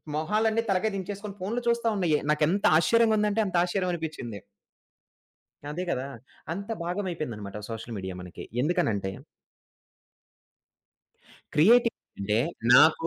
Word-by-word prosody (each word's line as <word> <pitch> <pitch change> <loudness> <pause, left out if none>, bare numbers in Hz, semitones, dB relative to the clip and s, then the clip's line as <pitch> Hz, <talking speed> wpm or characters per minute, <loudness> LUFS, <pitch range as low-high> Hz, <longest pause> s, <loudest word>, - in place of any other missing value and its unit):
మొహాలన్నీ 215 +8 +1
తలకాయ 195 +3 +1
దించేసుకొని 200 +1 -5
ఫోనులు 220 +6 -2
చూస్తా 235 0 +2
ఉన్నాయి. 170 -6 +2
నాకెంత 155 +6 +2
ఆశ్చర్యంగా 225 +5 +4
ఉందంటే 210 +1 +2
అంత 185 - -5
ఆశ్చర్యమనిపిచ్చింది. 165 - -3 1.3
అదే 175 +5 -3
కదా! 130 -4 -1 0.5
అంత 200 +5 -6
భాగం 180 +4 -2
అయిపోయిందన్నమాట 105 - -5
సోషల్ 115 +1 -6
మీడియా 95 -1 -5
మనకి. 90 -1 -9 0.2
ఎందుకనంటే 115 - 0 2.4
క్రియేటివిటీ 230 +9 +6 0.3
అంటే 105 +2 +1 0.4
నాకు 160 +3 +6
175 Hz, 105 wpm, -27 LUFS, 130-205 Hz, 2.4 s, క్రియేటివిటీ